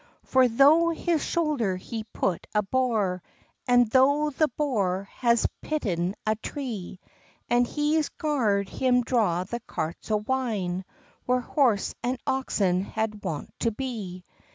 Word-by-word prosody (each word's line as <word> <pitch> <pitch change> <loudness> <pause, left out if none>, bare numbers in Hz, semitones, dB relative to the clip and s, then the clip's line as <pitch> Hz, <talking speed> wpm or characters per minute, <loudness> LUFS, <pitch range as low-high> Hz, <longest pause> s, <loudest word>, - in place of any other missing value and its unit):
For 260 -1 +4
thro 290 +8 +5
his 330 -1 0
shoulder 295 - 0
he 220 +4 -6
put 190 -5 -2
a 210 - +3
bore, 210 -5 0 0.5
An 245 -1 +5
thro 285 +5 +3
the 310 +2 +2
bore 200 -9 -1
has 235 -2 +3 0.2
pitten 190 - -1
a 215 0 +2
tree, 220 - -6 0.5
And 240 0 +4
he's 300 +2 +1
gard 220 -10 0
him 250 +1 +2
draw 215 -8 +1
the 235 +6 -5
carts 165 -7 -5
o 215 - +3
wine, 210 -6 -2 0.4
Where 250 0 +2
horse 245 -7 +1
and 250 +2 -1
oxen 195 -9 +1
had 215 +1 -3
wont 150 -3 -4
to 230 - +2
be. 210 -7 -5
235 Hz, 135 wpm, -26 LUFS, 200-265 Hz, 0.5 s, thro